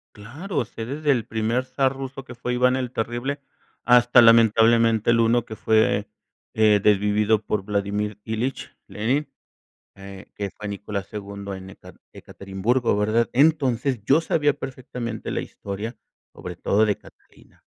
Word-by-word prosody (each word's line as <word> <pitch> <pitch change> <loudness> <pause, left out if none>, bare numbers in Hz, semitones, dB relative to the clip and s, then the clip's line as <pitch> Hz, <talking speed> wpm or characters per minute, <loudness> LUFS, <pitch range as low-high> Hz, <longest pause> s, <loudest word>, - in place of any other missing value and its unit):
Claro, 130 - -4
sé 115 0 -8
desde 145 +2 0
el 120 -4 0
primer 115 +3 -1
zar 130 +1 0
ruso 135 0 -7
que 125 - -10
fue 125 +1 -3
Iván 125 +1 +3
el 130 -2 -2
terrible 120 +5 -3 0.4
hasta 125 0 +6
lamentablemente 115 0 +5
el 115 0 +3
uno 115 +1 +2
que 110 - -8
fue, 110 -2 +1 0.4
eh, 105 -2 +4
desvivido 105 +1 +2
por 105 -2 -1
Vladimir 105 0 -2
Ilich 115 +4 -4
Lenin, 130 +8 -2 0.6
eh, 100 0 -11
que 100 - -3
es - - -9
Fanny 100 -2 -5
Cola 100 -2 -4
Segundo 100 -1 -7
en 95 0 -9
Ekar - - -15
Ekaterimburgo, 100 +4 -2
¿verdad?, 110 +3 +1
entonces, 135 -3 +2
yo 145 +7 +4
sabía 145 -3 +1
perfectamente 125 -4 -6
la - - -2
historia, 105 +4 -7 0.4
sobre 90 -1 -8
todo 105 +4 +2
de 105 -2 0
Catalina, - - -21
115 Hz, 150 wpm, -23 LUFS, 105-125 Hz, 0.6 s, hasta